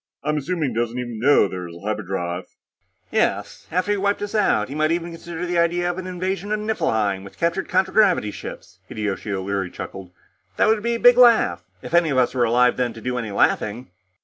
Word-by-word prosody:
I'm 150 +1 0
assuming 155 0 -1
he 115 - -7
doesn't 120 +1 -1
even 120 -3 -5
know 135 -3 +5
there 90 -2 -6
is 85 - -11
a 85 - -12
hyperdrive." 95 -4 -3 0.7
"Yes. - - -1
After 185 +5 0
he'd 205 - +1
wiped 200 +1 0
us 205 - -5
out, 155 - +2
he 135 - -7
might 155 +1 +1
even 170 0 -2
consider 170 +1 -6
the 175 -1 0
idea 175 +1 +1
of 175 - -6
an 185 - -6
invasion 185 +2 -3
of 215 - 0
Niflheim 110 - 0
with 100 - -13
captured 170 +3 -1
contragravity 185 - +3
ships," - - -9
Hideyoshi 105 0 -4
O'Leary 95 -1 -2
chuckled. 95 +1 -8 0.5
"That - - +4
would 220 -1 +2
be 235 +1 0
a - - -3
big 245 +1 +6
laugh 230 - +5 0.2
if - - -8
any 170 -2 +4
of 135 - 0
us 125 -1 +2
were 125 -2 +2
alive, 125 +2 +3
then, 125 -2 0
to 115 - -10
do 125 +1 -2
any 115 -3 -4
laughing." 105 +1 0
145 Hz, 215 wpm, -22 LUFS, -, 0.7 s, big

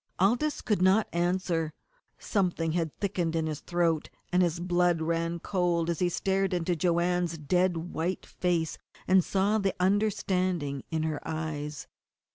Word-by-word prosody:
Aldous 240 +11 +2
could 210 -5 0
not 190 +4 +4
answer; 170 -2 0 0.4
something 175 -5 0
had 165 -2 -1
thickened 180 -5 -1
in 160 -1 +1
his 155 -2 -3
throat, 170 -3 0 0.2
and 180 - +4
his 170 -1 +1
blood 175 -1 +2
ran 165 +1 -1
cold 170 -2 0
as 165 - -3
he 180 - +2
stared 190 +1 0
into 175 0 0
Joanne's 175 0 +1
dead 180 +4 +1 0.2
white 175 +4 -2
face 170 -3 -1 0.3
and 185 -1 +5
saw 200 +4 +1
the 195 -2 0
understanding 185 -7 0
in 160 -1 -1
her 155 -2 -1
eyes. 155 -2 -4
175 Hz, 145 wpm, -29 LUFS, 165-185 Hz, 0.4 s, and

